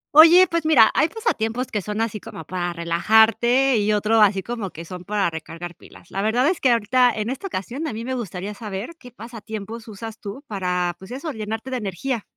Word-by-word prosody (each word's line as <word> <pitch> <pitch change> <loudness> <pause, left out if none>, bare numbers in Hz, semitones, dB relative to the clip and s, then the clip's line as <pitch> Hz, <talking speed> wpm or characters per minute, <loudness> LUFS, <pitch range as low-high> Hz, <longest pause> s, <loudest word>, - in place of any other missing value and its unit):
Oye, 335 +4 +9
pues 335 -1 -1
mira, 300 -8 +6
hay 305 +4 +3
pasatiempos 255 - -2
que 210 - -1
son 210 +3 -4
así 220 -2 -1
como 165 - -9
para 175 0 -3
relajarte, 220 +9 +3
y 210 0 +1
otro 215 +2 +3
así 195 -2 +4
como 230 -2 -4
que 165 0 -10
son 180 +1 -8
para 200 -4 0
recargar 165 +2 -7
pilas. 170 - -17
La 195 - -2
verdad 235 +6 +2
es 355 +1 0
que 260 - +4
ahorita, 245 +2 +3
en 215 +2 -2
esta 270 +9 -5
ocasión, 270 - -4
a 255 - -4
mí 225 +2 -5
me 260 - -3
gustaría 205 -4 -5
saber 205 +3 -6
qué 250 - -12
pasatiempos 225 0 -8
usas 225 +1 -8
tú 215 +8 -8
para, 180 -5 -1
pues, 190 - -12
eso, 275 +6 -5
llenarte 220 +2 -5
de 255 - -1
energía. 220 +3 -3
220 Hz, 210 wpm, -22 LUFS, 195-250 Hz, -, Oye